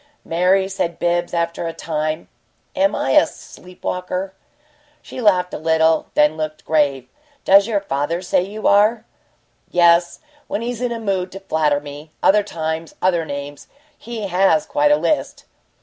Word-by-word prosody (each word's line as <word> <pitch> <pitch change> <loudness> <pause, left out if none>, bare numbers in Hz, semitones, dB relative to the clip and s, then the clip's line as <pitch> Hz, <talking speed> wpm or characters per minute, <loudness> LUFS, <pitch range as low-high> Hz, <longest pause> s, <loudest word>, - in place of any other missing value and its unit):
"Mary," 185 +3 +2
said 180 -3 -3
Bibbs, 175 0 0
after 170 0 -2
a 165 - -4
time, 155 0 -3 0.5
"am 290 +1 +2
I - - -1
a - - +5
sleep 180 0 -15
walker?" 180 +1 -3 0.7
She 255 - -8
laughed 185 -5 +2
a - - -4
little, 160 0 +2
then 150 +1 +4
looked 155 0 -5
grave. 145 -4 +1 0.4
"Does 200 +2 +6
your 210 -3 0
father 165 +1 -2
say 180 - +1
you 205 +4 -7
are?" 215 +3 +3 0.6
"Yes 170 0 +3 0.3
when 220 - -3
he's 240 0 -4
in 245 -1 -1
a 230 - -3
mood 195 -4 -2
to 195 - -7
flatter 155 -6 0
me. 145 +1 -10
Other 210 +2 +5
times, 160 -4 -5
other 175 -3 +1
names. 140 0 -7 0.3
He 230 -5 -6
has 195 +2 +2
quite 290 +1 +1
a 295 - +5
list." 305 - -2
180 Hz, 160 wpm, -20 LUFS, 160-200 Hz, 0.7 s, Does